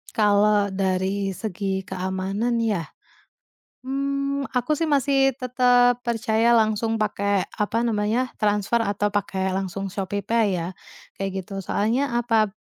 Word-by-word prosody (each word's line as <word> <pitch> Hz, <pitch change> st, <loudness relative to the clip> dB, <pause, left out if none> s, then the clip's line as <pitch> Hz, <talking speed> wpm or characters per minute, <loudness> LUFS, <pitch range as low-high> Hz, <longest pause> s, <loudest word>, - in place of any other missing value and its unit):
Kalau 205 Hz, -1 st, +3 dB
dari 190 Hz, +1 st, -1 dB
segi 195 Hz, -2 st, -3 dB
keamanan, 190 Hz, +5 st, -2 dB
ya? 200 Hz, -8 st, -1 dB, 1.0 s
Mmm, 275 Hz, +1 st, -1 dB
aku 250 Hz, +4 st, +1 dB
sih 330 Hz, -, 0 dB
masih 275 Hz, -1 st, +3 dB
tetap 245 Hz, -1 st, +3 dB
percaya 230 Hz, -1 st, +1 dB
langsung 225 Hz, 0 st, +2 dB
pakai, 200 Hz, -2 st, 0 dB
apa 220 Hz, +2 st, 0 dB
namanya, 225 Hz, +3 st, 0 dB
transfer 210 Hz, +2 st, +1 dB
atau 205 Hz, 0 st, 0 dB
pakai 190 Hz, -2 st, -1 dB
langsung 195 Hz, +1 st, -3 dB
ShopeePay 200 Hz, +4 st, -1 dB
ya, 165 Hz, -, -3 dB, 0.5 s
kayak 195 Hz, -1 st, -3 dB
gitu. 195 Hz, -2 st, -5 dB
Soalnya, 235 Hz, +9 st, 0 dB
apa? 225 Hz, -4 st, +2 dB
210 Hz, 120 wpm, -24 LUFS, 195-240 Hz, 1.0 s, Kalau